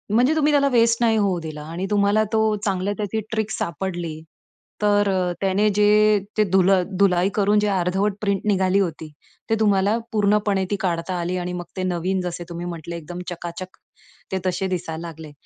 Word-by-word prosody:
म्हणजे 255 +7 +4
तुम्ही 300 -1 +3
त्याला 280 -1 +4
वेस्ट 230 -1 +4
नाही 225 -2 +3
होऊ 195 -4 +1
दिला 155 -2 -7
आणि 180 +3 -3
तुम्हाला 205 +1 +3
तो 220 - +3 0.3
चांगल्या 195 0 0
त्याची 210 +1 -2
ट्रिक 220 -1 -1
सापडली. 170 -3 -4 0.6
तर 205 -1 +3
अ, 185 -2 0
त्याने 195 +2 +2
जे 210 0 +4 0.2
ते 215 - +5
धुल-धुलाई 190 0 +3
करून 205 0 +3
जे 210 - +1
अर्धवट 190 +1 +1
प्रिंट 200 -2 0
निघाली 190 -1 +2
होती, 160 -4 -3 0.4
ते 225 - +3
तुम्हाला 205 0 +3
पूर्णपणे 205 -2 +2
ती - - +2
काढता 175 0 -1
आली 175 +2 -2
आणि 180 0 -3
मग 175 0 -4
ते 185 - -1
नवीन 185 +1 -1
जसे 175 -1 -4
तुम्ही 170 +1 -6
म्हंटलं, 170 -1 -6
एकदम 170 +2 -7
चकाचक 175 +1 -7 0.5
ते 190 - 0
तसे 185 +1 0
दिसायला 170 -2 -4
लागले. 160 -2 -10
190 Hz, 175 wpm, -22 LUFS, 175-210 Hz, 0.6 s, ते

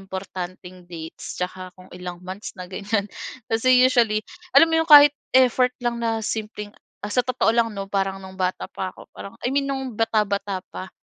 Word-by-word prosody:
importanteng 185 -1 -8
dates 160 -2 -8
tsaka 185 0 -5
kung 185 0 -16
ilang 180 0 -8
months 190 +3 -7
na 185 - -7
ganyan. 200 +2 -1 0.5
Kasi 250 +3 +4
usually, 230 -4 +3 0.3
alam 330 - +8
mo 325 0 +3
'yong 325 - -3
kahit 290 -1 +10 0.2
effort 250 -1 +4
lang 240 -1 -1
na 225 -1 -1
simpleng, 210 -1 -4 0.3
ah 205 - -5
sa 250 - +2
totoo 255 -3 +2
lang, 230 -1 +1
'no? 195 0 -6
Parang 195 -1 -1
no'ng 190 0 -11
bata 185 0 -2
pa 185 - -4
ako - - -14
parang 200 - -10
I 245 - 0
mean, 275 0 0
no'ng 265 -2 -3
bata-bata 200 -3 0
pa. 185 - -7
210 Hz, 185 wpm, -23 LUFS, 185-245 Hz, 0.5 s, kahit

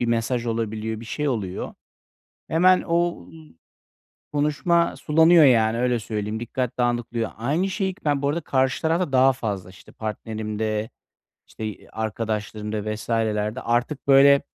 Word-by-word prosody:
bir 120 - 0
mesaj 115 +1 0
olabiliyor, 110 -1 -3
bir 115 - -9
şey 150 +5 -2
oluyor. 100 -7 -3 0.7
Hemen 180 +3 +4
o 170 - 0
ı - - -16 1.0
konuşma 150 +4 +1
sulanıyor, 160 +1 +5
yani, 115 -3 +4
öyle 125 -1 +1
söyleyeyim. 105 0 -4
Dikkat 125 +1 -3
dağılıyor. 120 -1 -1
Aynı 155 - 0
şeyi 190 -1 -1
k 205 - -27
ben 145 -2 +1
bu 140 - +1
arada 165 +4 -1
karşı 130 0 0
tarafta 165 -1 0
daha 130 +1 +5
fazla, 100 -7 -4
işte, 95 - -16
partnerimde, 110 0 -3 0.6
işte, 110 - -7
i 105 - -7
arkadaşlarımda 110 -1 -3
vs.lerde 110 +1 -1
artık, 120 +5 -1
böyle, 140 +1 +7
120 Hz, 140 wpm, -23 LUFS, 110-145 Hz, 1.0 s, böyle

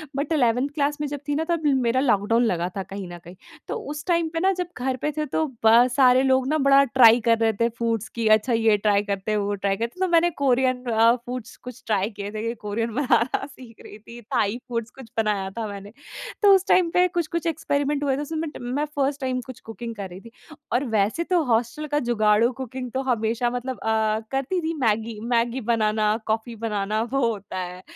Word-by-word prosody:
But 285 +3 -2
11th 250 -2 +2
class 290 -1 0
में 295 - -1
जब 290 0 -5
थी 290 - 0
ना 320 - 0
तब 335 -2 0
मेरा 260 -3 +2
लॉकडाउन 230 -1 +2
लगा 175 -3 0
था 195 - -2
कहीं 195 -1 -7
न 175 0 -9
कहीं। 175 +2 -12 0.3
तो - - -3 0.2
उस 295 0 -6
टाइम 335 -2 +1
पे 330 - -1
ना 380 +2 +3
जब 360 -1 -3
घर 255 +1 -1
पे 300 - 0
थे 305 - 0
तो 315 - +2 0.2
ब 235 +3 +7
सारे 255 -1 +5
लोग 260 -1 +2
ना 310 +2 +1
बड़ा 275 -1 +5
ट्राई 240 -3 +6
कर 230 -1 +4
रहे 225 -1 +2
थे 230 - +3
फूड्स 230 -2 -1
की 230 -1 0
अच्छा 215 +3 +3
ये 225 -2 +3
ट्राई 205 0 +2
करते 200 +1 -3
हैं 210 - +1
वो 205 0 -1
ट्राई 195 0 -1
करते 235 - -4
हैं। 375 - +2
तो - - -5
मैंने 340 +1 +4
कोरियन 255 -1 +2
अ, 230 0 +4
फूड्स 245 -2 -6
कुछ 250 0 -11
ट्राई 205 -1 +1
किये 205 -1 -7
थे 215 - -5
कि 230 - -1
कोरियन 225 +3 -2
बनाना 255 -3 +1
सीख 255 -5 -14
रही 210 - -11
थी। 235 +2 -12
थाई 230 -2 -1
फूड्स 230 -1 -3
कुछ 265 -4 -12
बनाया 205 -3 0
था 220 -2 -2
मैंने। 200 0 -8 0.5
तो 405 -2 +7
उस 380 0 +1
टाइम 360 -2 +4
पे 360 +1 +4
कुछ-कुछ 335 -1 -3
एक्सपेरिमेंट 290 -2 -1
हुए 275 -2 +1
थे। - - -3
उसमें 315 +2 -4
मैं 325 -1 -3
ट - - -5
मैं 255 +5 -2
फ़र्स्ट 280 0 0
टाइम 255 -1 -1
कुछ 255 -2 -10
कुकिंग 230 +1 -8
कर 195 -2 -6
रही 185 +2 -11
थी। 230 - -14 0.4
और 250 +4 +2
वैसे 210 +12 +1
तो 345 -2 +1
हॉस्टल 245 +6 0
का - - +3
जुगाड़ू 215 +1 +3
कुकिंग 255 0 -6
तो 265 - -2
हमेशा 230 +2 0
मतलब 245 +1 -4
अ, 220 -1 +1
करती 275 +7 -1
थी 325 +1 -2
मैगी 220 -1 0
मैगी 240 +1 +1
बनाना, 215 -1 +1
कॉफी 225 +2 -2
बनाना 215 -1 -2
वो 275 - +2
होता 200 -4 -5
है, 180 0 -6
235 Hz, 230 wpm, -24 LUFS, 215-275 Hz, 0.5 s, ब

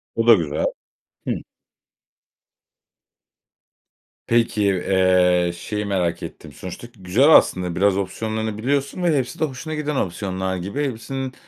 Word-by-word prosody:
O 115 +1 0
da 115 - +10
güzel. 75 -6 0 0.6
Hıı. - - +1 2.9
Peki, 115 -3 +2
eee, 90 -2 +3
şeyi 105 +4 -4
merak 90 -4 -1
ettim, - - -9
sonuçta 95 +6 -8
güzel 100 - +3
aslında 90 -2 +3
biraz 100 0 +3
opsiyonlarını 110 +2 -3
biliyorsun 140 +8 -1
ve 160 -4 +3
hepsi 135 +6 -3
de 160 - +2
hoşuna 155 +3 -6
giden 150 -1 -2
opsiyonlar 95 -1 -2
gibi. 100 +12 -3
Hepsinin 130 +1 -4
105 Hz, 120 wpm, -22 LUFS, 90-130 Hz, 2.9 s, da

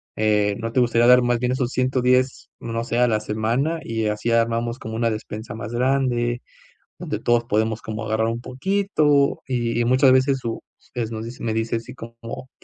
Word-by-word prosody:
eh, 105 -1 +2
no 115 0 -4
te - - +3
gustaría 120 0 +3
dar 125 0 +7
más 120 -1 +1
bien 125 +1 0
esos 130 -2 -1
110, 130 0 +1
no 115 0 -3
sé, 120 0 -2
a 125 - +5
la 110 -2 +1
semana?, 115 +10 -1
y 115 -1 -2
así 105 +2 -1
armamos 115 +1 +1
como 110 0 -6
una 115 0 +1
despensa 110 +1 -6
más 110 0 -6
grande, 120 -1 +1 0.6
donde - - -4
todos 120 0 +2
podemos 110 0 0
como 110 0 -5
agarrar 110 +1 0
un 115 +1 -3
poquito", 145 0 +1
y 120 -3 -1
y - - +1
muchas 130 +2 +5
veces 130 +1 +3
su 115 -2 -4 0.3
es 115 -2 -2
nos 110 -1 -5
dice 120 +2 -9
me 110 -1 -1
dice 115 +1 -1
así 115 +3 -9
como: 115 +1 -9
120 Hz, 195 wpm, -22 LUFS, 115-125 Hz, 0.6 s, dar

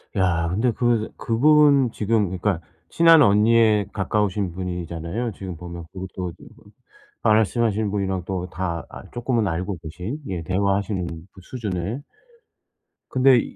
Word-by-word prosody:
야 85 -3 +1
근데 115 +7 +1
그 120 -2 0
그분 140 +1 +4
지금 110 -1 +1
그러니까 95 -1 -1 0.3
친한 165 -2 +6
언니의 110 -1 +4
가까우신 100 -2 -1
분이잖아요 90 +4 -4
지금 90 -4 -7
보면. 85 -1 -8
그것도 95 -1 -5 0.9
말씀하신 110 -1 +2
분이랑 95 -3 -1
또 90 -2 -4
다 85 -1 -3
아 - - -10
쪼끔은 120 -3 0
알고 90 +3 -2
계신 90 - -5
예 90 -3 -4
대화하시는 100 +1 0 0.3
그 95 - -14
수준의. 105 +1 -4 1.1
근데 130 -1 +5
100 Hz, 275 characters per minute, -23 LUFS, 90-115 Hz, 1.1 s, 친한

